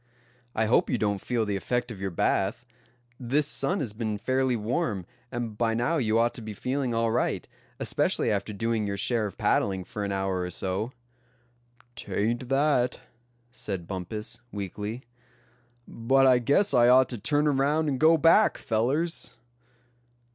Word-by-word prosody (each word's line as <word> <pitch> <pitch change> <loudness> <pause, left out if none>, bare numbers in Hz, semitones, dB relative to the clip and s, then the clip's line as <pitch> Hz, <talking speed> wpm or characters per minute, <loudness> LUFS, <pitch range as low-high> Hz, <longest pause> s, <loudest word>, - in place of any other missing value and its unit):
"I 110 - +2
hope 110 - +3
you - - +1
don't 100 -3 -1
feel 120 -3 -1
the 105 -1 -1
effect 120 +4 -2
of 100 -4 -8
your 95 - -1
bath. 100 +6 0 0.5
This 135 +4 +1
sun 185 +6 0
has 115 -7 -4
been 110 -1 -3
fairly 130 +3 +1
warm, 110 - -2 0.3
and 120 -3 -4
by 115 0 0
now 125 +8 +1
you 110 -5 +1
ought 120 +1 +2
to - - -7
be 110 -1 -6
feeling 130 +4 -2
all 115 0 +1
right, 120 - -1 0.3
especially - - +1
after 100 +1 -1
doing 110 +1 -1
your 100 0 -3
share 115 +1 0
of 100 - -10
paddling 95 -2 +1
for 105 +3 -6
an 100 - -2
hour 95 -1 -1
or 90 - -3
so." 95 +6 -3 1.0
"'Tain't 120 +4 -2
that," 135 -3 +2 0.5
said 95 -8 -4
Bumpus, 95 +5 -5
weakly; 105 +4 -5 0.8
"but 135 +4 +2
I 130 -2 +6
guess 140 - +2
I 120 -1 +6
ought 130 0 +6
to 120 - -5
turn 145 +7 +1
around, 145 +3 +2
and 135 -3 -1
go 160 +1 +6
back, 165 +7 +5
fellers." 135 +10 -1
115 Hz, 160 wpm, -27 LUFS, 105-130 Hz, 1.0 s, I